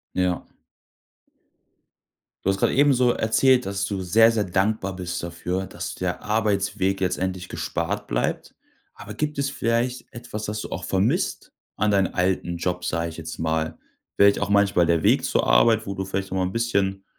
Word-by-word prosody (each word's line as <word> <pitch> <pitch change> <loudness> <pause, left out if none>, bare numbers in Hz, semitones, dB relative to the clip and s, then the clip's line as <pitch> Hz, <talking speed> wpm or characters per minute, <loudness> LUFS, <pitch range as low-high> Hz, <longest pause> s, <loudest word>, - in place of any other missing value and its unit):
Ja. 90 -1 0 2.0
Du 95 - +3
hast 95 - +1
grade - - +2
ebenso 130 -3 +4
erzählt, 125 +3 +3
dass 100 0 -2
du 100 -2 -3
sehr, 110 +5 +5
sehr 115 -2 +1
dankbar 95 +1 -1
bist 90 -2 -4
dafür, 90 +2 -3
dass - - -6
der 90 -1 -3
Arbeitsweg 100 -2 0
jetzt 95 -1 0
endlich 95 -1 -3
gespart - - -3
bleibt. - - -2 0.4
Aber 105 0 -9
gibt 150 +5 -3
es 140 0 0
vielleicht 125 -1 -1
etwas, 115 -3 -7
das 105 +1 -3
du - - -6
auch - - -5
vermisst - - -1 0.2
an 105 - +1
deinen 95 -3 +2
alten 90 -1 0
Job, 90 +1 -2
sage 85 +1 -1
ich - - -12
jetzt 80 -1 -7
mal? 80 0 -1 0.4
Vielleicht 100 0 +5
auch 100 0 -2
manchmal 100 -4 +3
der 85 -1 +1
Weg - - +4
zur - - 0
Arbeit, 110 - +4
wo 100 - -3
du 95 - -3
vielleicht 95 0 -4
auch - - -2
mal 95 - +1
'n 90 - -3
bisschen 100 -4 -1
95 Hz, 180 wpm, -24 LUFS, 90-110 Hz, 2.0 s, sehr